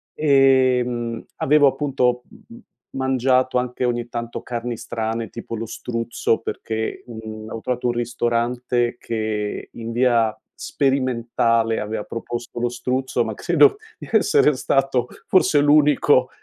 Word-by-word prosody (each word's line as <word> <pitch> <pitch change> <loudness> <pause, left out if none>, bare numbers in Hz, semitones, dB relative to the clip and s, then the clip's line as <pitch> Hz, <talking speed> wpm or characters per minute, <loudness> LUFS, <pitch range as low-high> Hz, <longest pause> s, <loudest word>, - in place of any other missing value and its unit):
Ehm, 130 -5 +2
avevo 145 +1 +4
appunto 130 -3 0 0.3
m 235 - -12
m 240 - -17 0.3
mangiato 130 -1 +1
anche 125 0 -2
ogni 120 -1 -2
tanto 120 0 -5
carni 120 0 -4
strane 115 0 -4
tipo 115 0 -7
lo 115 +1 -4
struzzo 115 0 -2
perché, 110 -1 -4
mhmm, 110 -2 -8
avevo 115 - -6
trovato 125 0 -3
un 120 - +1
ristorante 120 +1 -1
che 110 -2 -3
in 115 0 -6
via 120 -3 +2 0.2
sperimentale 115 -4 0
aveva 105 0 -3
proposto 120 +1 -6
lo 120 - +1
struzzo, 125 +2 -1
ma - - -4
credo 415 -1 +4 0.2
di - - -10
essere 200 -9 +4
stato 135 -1 +1 0.2
forse 155 -6 +4
l'unico 145 0 +4
120 Hz, 130 wpm, -22 LUFS, 115-130 Hz, 0.3 s, avevo